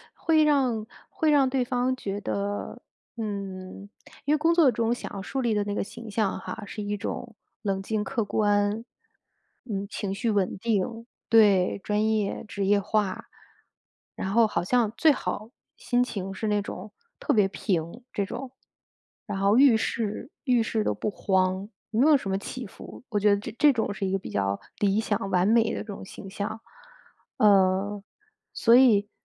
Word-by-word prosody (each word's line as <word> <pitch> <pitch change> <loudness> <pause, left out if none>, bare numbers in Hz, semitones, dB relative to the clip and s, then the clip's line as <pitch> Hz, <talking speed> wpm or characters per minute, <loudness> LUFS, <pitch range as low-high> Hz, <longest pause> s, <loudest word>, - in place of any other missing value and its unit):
会 315 -2 +3
让 255 -7 +2 0.2
会 315 - 0
让 280 -3 +4
对 260 -1 +1
方 250 +1 0
觉 200 -5 -4
得， 205 0 -3 0.4
嗯， 200 -2 -6 0.4
因 290 - +2
为 - - +4
工 325 +3 +3
作 310 -7 +6
中 230 +1 0
想 245 - -6
要 195 - -5
树 265 +7 -4
立 235 -3 +1
的 210 - +1
那 205 0 -3
个 - - 0
形 230 +3 -10
象 200 -2 0
哈， 200 - -7
是 210 - -7
一 205 0 -2
种 225 +2 -5 0.3
冷 195 -3 -1
静、 210 +1 -1
客 230 -3 -2
观， 205 +1 +1 0.8
嗯， 200 -4 -3
情 200 -1 -4
绪 230 +2 0
稳 200 -3 0
定 225 +2 -1 0.2
对， 205 -5 +5
专 210 +1 +1
业 215 -2 -1
职 200 -1 -3
业 200 +1 +4
化。 200 -1 -1 0.9
然 190 - -3
后 230 +2 +5
好 170 -5 -1
像 230 +2 +2
最 315 +6 +6
好 220 -5 -3 0.3
心 245 0 +1
情 195 -6 -5
是 215 +3 -3
那 210 -1 +2
种 200 +1 -8 0.3
特 - - 0
别 210 -4 +4
平 185 +2 -2
这 200 - 0
种， 255 +6 -6 0.8
然 205 -2 -3
后 200 +3 +4
遇 265 -5 +7
事 225 +3 -3
遇 245 -4 +3
事 220 -1 -1
都 - - 0
不 210 - -2
慌， 190 0 0 0.2
没 225 +1 +1
有 300 - +7
什 205 - -6
么 190 - +1
起 250 +5 -6
伏， 195 - -12
我 210 -4 0
觉 210 +1 +4
得 200 - +4
这 - - -6
这 295 - +7
种 220 -4 -1
是 195 -1 -3
一 - - -2
个 195 - +2
比 - - -8
较 100 0 -1 0.2
理 200 0 +2
想、 205 -3 -1
完 180 +1 +3
美 225 +1 +4
的 - - -3
这 - - -6
种 200 -3 -7
形 195 - -10
象。 205 +3 -5 0.8
嗯， 200 0 +3 0.5
所 230 - +4
以 220 -6 +5
210 Hz, 195 characters per minute, -26 LUFS, 195-235 Hz, 0.9 s, 遇